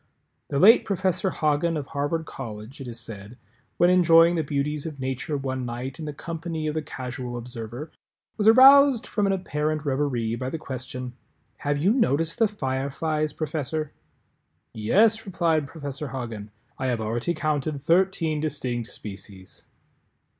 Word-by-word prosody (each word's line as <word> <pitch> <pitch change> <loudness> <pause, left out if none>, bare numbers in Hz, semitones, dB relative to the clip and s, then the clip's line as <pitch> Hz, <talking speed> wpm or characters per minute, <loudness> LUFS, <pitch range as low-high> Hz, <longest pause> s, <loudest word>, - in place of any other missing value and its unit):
The 140 - -2
late 215 - +7
Professor 190 -1 0
Hagen 155 0 +1
of 145 - -4
Harvard 145 +4 -2
College, 115 0 -8
it 130 - -7
is 120 -1 -7
said, 110 0 -9 0.4
when 175 +1 +5
enjoying 170 -1 +6
the 165 - +1
beauties 145 +1 -2
of 150 -3 -8
Nature 130 +3 -2
one 130 -1 -3
night 125 +3 -5
in 160 - -5
the 150 - -3
company 165 +1 -5
of 155 - -1
the 155 - -1
Casual 125 -4 -6
Observer, 120 +4 -7 0.4
was 210 -1 0
aroused 265 +1 +8
from 205 -2 0
an - - +2
apparent 155 -5 -2
reverie 130 -5 0
by 130 +2 -3
the 165 - -4
question 130 -3 -6 0.4
"Have 145 0 -1
you 185 +9 +3
noticed 165 - +1
the 225 - +5
Fireflies, 150 -2 -2
Professor?" 155 0 -3 0.8
"Yes," 210 - +3
replied 165 -5 +1
Professor 145 0 -6
Hagen, 115 -6 -6 0.3
"I 130 - -1
have 120 -3 0
already 115 +10 -1
counted 155 -1 -1
thirteen 165 0 +2
distinct 130 -6 -2
species." 95 -4 -9
145 Hz, 150 wpm, -25 LUFS, 130-165 Hz, 0.8 s, aroused